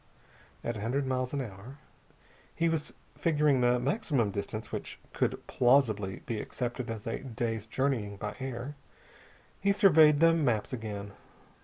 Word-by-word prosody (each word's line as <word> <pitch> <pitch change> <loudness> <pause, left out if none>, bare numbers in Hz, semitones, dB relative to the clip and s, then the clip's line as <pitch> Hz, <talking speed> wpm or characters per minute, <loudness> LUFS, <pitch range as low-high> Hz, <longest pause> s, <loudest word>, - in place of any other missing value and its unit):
"At 120 -2 -2
a - - -6
hundred 130 +6 0
miles 130 -1 -1
in 140 - -1
hour...." 110 +5 -10 0.8
He 170 0 +2
was 160 -2 -2 0.2
figuring 150 -5 +2
the 120 0 +4
maximum 135 - 0
distance 105 +3 -5
which - - -5
could - - -1
plausibly 115 -7 +2
be 110 -3 -2
accepted 125 -1 -4
as 110 -2 -5
a 115 - -2
day's 115 -4 -3
journeying 115 -5 -1
by 105 +1 -5
air. 130 +1 -4 0.9
He 200 - +2
surveyed 160 -7 +6
the 165 +1 +6
maps 125 -7 +1
again. 105 -4 -5
125 Hz, 145 wpm, -30 LUFS, 110-140 Hz, 0.9 s, surveyed